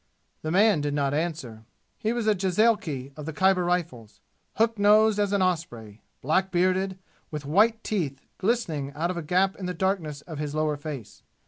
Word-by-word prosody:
The 155 - -3
man 200 -1 +4
did 145 0 -1
not 140 -1 0
answer. 150 -8 -3 0.4
He 220 - 0
was 235 -2 -2
a 215 - +4
jezailchi 185 - 0
of 150 0 -8
the 160 - -4
Khyber 190 +2 +3
Rifles 170 -11 -3 0.4
hook 225 -1 +1
nosed 210 +1 +5
as 205 -1 +1
an 200 -2 +2
osprey 120 - -3 0.2
black 185 +7 +1
bearded 185 +1 +1 0.3
with 150 -3 -6
white 220 +9 +3
teeth 155 -10 -2 0.2
glistening 170 - -1
out 165 +4 -1
of 180 - -5
a - - -2
gap 185 +5 +1
in 185 - -5
the 180 - -3
darkness 165 -6 -1
of 160 -3 -8
his 150 0 -4
lower 155 -1 +1
face. 145 -6 -8
175 Hz, 185 wpm, -26 LUFS, 150-195 Hz, 0.4 s, nosed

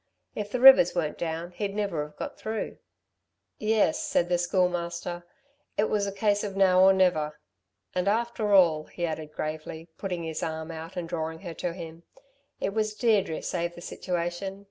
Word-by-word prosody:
If 205 -1 -4
the 250 - -2
rivers 260 -10 +8
were 160 -4 0
down 165 +1 -4
he'd 200 +2 -4
never've 160 -8 -2
got - - -6
through." 220 0 -4 0.8
"Yes," 220 +8 +2
said 280 - +1
the 175 -1 +2
Schoolmaster. 175 -1 -1 0.5
"It 210 - +1
was 205 -1 +1
a - - -2
case 205 +1 +1
of 195 -2 -4
now 185 -1 +5
or 190 +1 +8
never." 165 -6 +2 0.5
"And, 180 +1 -1
after 220 0 0
all," 165 -6 +5
he 175 - -4
added 155 -2 -4
gravely, 155 +2 -5
putting 180 -4 -3
his 160 -1 -4
arm 160 0 -4
out 165 +2 -8
and 175 -2 -3
drawing 160 -1 -4
her 175 -4 -6
to 170 +1 -3
him, 165 -2 -9 0.6
"it 195 - -2
was 215 0 -1
Deirdre 210 -8 +1
saved 170 -1 -2
the 175 - -10
situation. 180 +2 -3
180 Hz, 170 wpm, -27 LUFS, 165-200 Hz, 0.8 s, rivers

